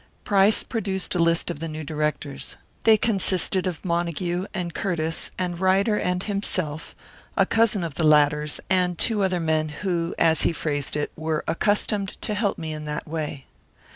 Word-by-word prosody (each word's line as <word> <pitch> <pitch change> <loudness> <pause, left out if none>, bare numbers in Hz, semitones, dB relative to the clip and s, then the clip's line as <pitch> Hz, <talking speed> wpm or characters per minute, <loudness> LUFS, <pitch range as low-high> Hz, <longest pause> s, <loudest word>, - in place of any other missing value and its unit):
Price 200 +1 +4
produced 195 -5 -2
a 180 - 0
list 170 0 +3
of - - -7
the 165 - -4
new 155 0 -6
directors. 150 -1 -3 0.3
They 220 -1 +7
consisted 190 -3 +2
of 180 +1 -5
Montague 175 +1 -1
and 175 -3 -4
Curtiss 165 -5 -2
and 175 -2 -2
Ryder 195 +3 +3
and 180 -2 -1
himself; 185 -7 -3 0.4
a - - +5
cousin 225 -4 +2
of 165 -3 -4
the 160 - -1
latter's, 150 -1 +3
and 180 -2 +1
two 220 -4 +2
other 185 -2 +1
men, 160 -1 0
who, 170 +1 -2
as 160 -1 +3
he - - +3
phrased 145 -4 -2
it, 150 0 -2
were 155 -1 -2
"accustomed 205 +2 0
to 210 - -1
help 205 -1 0
me 160 -1 -4
in 155 0 -6
that 150 0 -4
way." 150 -3 -4
170 Hz, 170 wpm, -24 LUFS, 155-195 Hz, 0.4 s, They